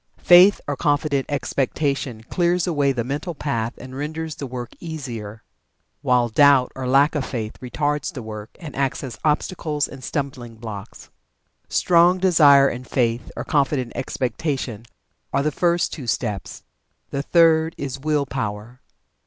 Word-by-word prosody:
Faith 180 +3 +7
or 145 - -1
confident 145 -1 0
expectation 140 -3 -1
clears 175 +6 +1
away 145 -6 +1
the 120 -3 -2
mental 150 +7 -4
path 120 -6 -2
and 130 0 -10
renders 155 +3 -4
the 140 - -6
work 125 -1 -6
easier, 115 -10 -7 0.6
while 125 -3 +3
doubt 135 +2 +5
or 130 -1 -4
lack 140 +3 +4
of 150 -3 -1
faith 110 -5 -4
retards 145 +3 -2
the 130 - -7
work, 110 -1 -7
and 155 -4 -8
acts 140 0 -1
as 120 -5 -7
obstacles 150 -1 0
and 135 -2 -11
stumbling 130 -5 -4
blocks. 110 -2 -9 0.6
Strong 175 +1 +4
Desire, 150 -7 +6
and 125 -1 -5
Faith, 120 -3 0
or - - -3
confident 135 -4 0
expectation 130 -3 -3 0.4
are 140 +1 +1
the 150 - +1
first 170 +3 +1
two 135 -6 -7
steps. 105 -6 -3 0.5
The 140 - -1
third 160 +1 +3
is 135 -1 -5
Will 150 0 0
power. 120 -1 -5
140 Hz, 145 wpm, -22 LUFS, 120-150 Hz, 0.6 s, Faith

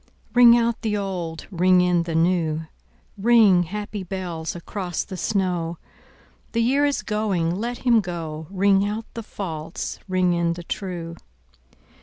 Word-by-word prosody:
Ring 240 -1 +8
out 235 -1 0
the 210 -2 -1
old, 180 -5 -4
ring 180 0 +4
in 180 -1 +3
the 170 -1 -4
new, 165 -2 +1 0.5
Ring, 215 -4 +5
happy 205 +3 -4
bells, 175 -4 -5
across 175 0 -4
the 190 - -8
snow: 180 -4 -1 0.8
The 230 0 +2
year 275 +5 +3
is 285 -1 0
going, 200 -6 0
let 235 +6 -3
him 235 -2 +5
go; 160 -4 -6
Ring 195 0 +3
out 210 +2 -3
the 230 - -5
false, 165 -7 -6
ring 185 -1 +2
in 170 -1 +1
the 175 0 -8
true. 170 -2 -5
185 Hz, 145 wpm, -23 LUFS, 170-210 Hz, 0.8 s, Ring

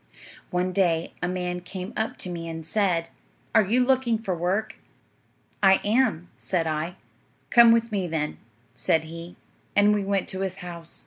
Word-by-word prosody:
"'One 180 0 0
day 170 -4 +1
a 180 - 0
man 180 0 -2
came 185 +3 -7
up 220 +1 -2
to 185 - -5
me 165 -1 -5
and 160 -1 -6
said, 175 -2 +1 0.4
"Are 225 - +7
you 240 +6 +2
looking 255 -3 +2
for 195 -5 -3
work?" 185 +6 -1 0.8
"I 190 -1 +6
am," 210 -6 +1
said 175 -3 -1
I. 160 +3 -2 0.6
"Come 235 -1 +8
with 230 0 +2
me, 195 -4 -1
then," 155 -2 -2 0.3
said 160 +5 +1
he; 165 +2 -9 0.4
and 205 +1 +5
we 205 -1 0
went 195 -1 0
to 190 - -5
his 190 -1 -2
house. 170 -2 -8
185 Hz, 170 wpm, -25 LUFS, 170-210 Hz, 0.8 s, Come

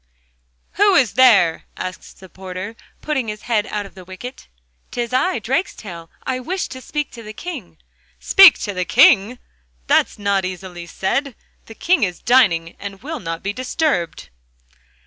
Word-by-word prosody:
'Who 405 0 +5
is 255 - +3
there?' 210 -11 +5
asks 185 0 -7
the 190 - -15
porter, 185 +3 -8 0.3
putting 265 -6 -2
his 210 0 -6
head 220 -4 0
out 210 -1 -3
of 195 - -13
the 185 - -12
wicket. 190 +8 -10 0.4
''Tis 240 0 -4
I, 360 +9 +2
Drakestail. 210 - -4
I 255 -1 -2
wish 365 +9 -3
to 260 - -8
speak 295 +2 -4
to 235 - -10
the 215 -1 -9
King.' 245 - -7 0.4
'Speak 390 -4 +7
to 205 - -3
the 180 -1 -1
King!... 205 +8 +5 0.5
That's - - +2
easily 185 -3 -3
said. 245 - -2 0.3
The 225 - -11
King 365 +8 +2
is 180 -4 0
dining, 175 -10 +3
and 200 0 -8
will 315 +1 -5
not 165 -4 -5
be 200 +1 -2
disturbed. 250 - -2
215 Hz, 155 wpm, -20 LUFS, 185-260 Hz, 0.5 s, Speak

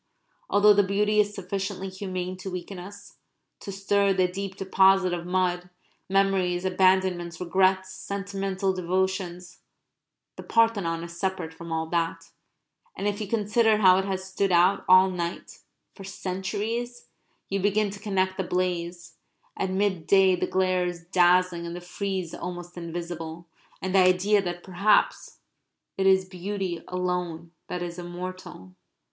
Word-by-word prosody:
Although 205 +1 +6
the 205 - +5
beauty 210 +2 +1
is 205 0 +2
sufficiently 195 0 -4
humane 185 -1 -4
to 190 +1 -6
weaken 180 +1 -6
us, 200 +3 -11 0.4
to 200 - -7
stir 195 0 +2
the 185 -1 +2
deep 190 +1 -5
deposit 190 -1 +3
of 175 0 -4
mud 180 -1 0 0.4
memories, 190 -2 +1
abandonments, 185 -2 +2
regrets, 190 +1 +1
sentimental 195 -1 -3
devotions 180 -1 -2 0.8
the - - -6
Parthenon 200 -8 +1
is 170 0 -9
separate 190 -4 -2
from 170 +1 -9
all 160 0 -1
that; 165 -1 -2 0.7
and 200 - -2
if 205 +1 -2
you 210 - -3
consider 220 +1 +2
how 185 -3 +6
it 190 - -2
has 190 -1 -3
stood 190 +1 -1
out 180 +3 +4
all 185 +1 +7
night, 175 -1 -5 0.3
for 195 - -11
centuries, 205 +6 -4 0.4
you 195 - -1
begin 205 +1 +1
to 200 - -9
connect 190 -2 -1
the 190 - -1
blaze 175 -1 -3 0.4
(at 190 - -2
midday 190 -1 +3
the 175 - -2
glare 185 -1 +1
is 170 -1 -6
dazzling 180 -1 +3
and 170 - -6
the - - -5
frieze 185 0 -4
almost 175 -1 -7
invisible) 170 -1 -6 0.4
with 190 0 -2
the 195 - +5
idea 185 +3 +4
that 175 -2 -5
perhaps 195 +3 +1 0.6
it 190 0 +1
is 190 0 +4
beauty 185 -1 -4
alone 180 -2 -3 0.2
that 180 0 -4
is 175 0 -6
immortal. 175 - -8
185 Hz, 145 wpm, -26 LUFS, 175-195 Hz, 0.8 s, all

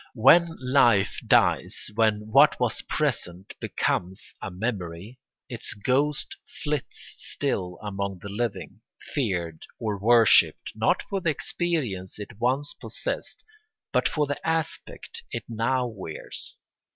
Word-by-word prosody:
When 165 +8 +6
life 120 -6 +3
dies, - - +2
when 110 -1 +2
what 140 +4 +6
was 120 -2 +1
present 100 - -2
becomes 95 +3 -2
a - - -4
memory, 95 +2 -4 0.3
its 120 -3 -4
ghost 135 +7 0 0.3
flits 150 -2 -3
still 90 -1 -2
among 100 -2 -3
the 100 - -8
living, 100 -2 -3 0.3
feared 90 - -1 0.2
or 105 -3 -2
worshipped 115 +1 +5
not - - +1
for 195 -1 -3
the 170 - +1
experience 140 - -1
it 105 +1 -9
once 130 +5 +1
possessed - - -4 0.5
but - - +3
for 150 -2 +1
the 145 0 -3
aspect 160 -1 -3
it - - -3
now 120 +3 0
wears. 95 -9 -6
115 Hz, 120 wpm, -26 LUFS, 100-140 Hz, 0.5 s, When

